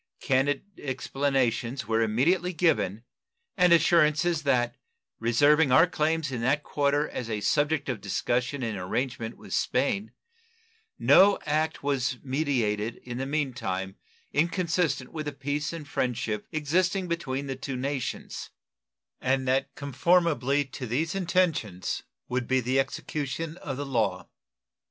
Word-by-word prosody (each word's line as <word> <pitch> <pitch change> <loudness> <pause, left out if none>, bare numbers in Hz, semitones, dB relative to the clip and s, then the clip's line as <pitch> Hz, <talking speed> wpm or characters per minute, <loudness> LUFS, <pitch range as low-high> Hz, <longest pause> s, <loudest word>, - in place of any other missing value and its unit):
Candid 135 +2 +1 0.2
explanations 135 -2 -1
were 115 0 +2
immediately 160 - +2
given 115 - +1 0.5
and 180 -3 +4
assurances 165 0 +4
that, 125 -5 +1 0.4
reserving 145 +6 +4
our 160 +6 +7
claims 160 -3 0
in 120 -3 -3
that 140 +5 +1
quarter 145 +1 +1
as 120 -2 -5
a 110 -2 -1
subject 145 +6 +1
of 125 -6 -3
discussion 125 +6 -1
and 110 -4 -2
arrangement 115 +4 -3
with - - -9
Spain, 195 - 0 0.9
no 200 +1 +6
act 155 0 0
was 130 -3 0
meditated 120 -6 0
in 120 0 -6
the 135 - -2
mean 145 -2 -1
time 95 -5 -3 0.4
inconsistent 165 -3 0
with 155 -2 -4
the - - -1
peace 145 +2 -2
and 165 -3 -7
friendship 115 -6 -2
existing 180 +5 +1
between 140 -5 -2
the 135 -1 -3
two 130 0 -5
nations, 135 0 -4 0.7
and 130 0 +1
that 135 +2 0
conformably 145 -1 +2
to 130 -1 -7
these 155 +9 -1
intentions 170 - 0 0.3
would 125 -1 -2
be 130 0 +3
the 130 +2 +1
execution 150 +3 -3
of 135 -6 -5
the 145 - -3
law. 115 -8 -1
140 Hz, 135 wpm, -27 LUFS, 125-155 Hz, 0.9 s, our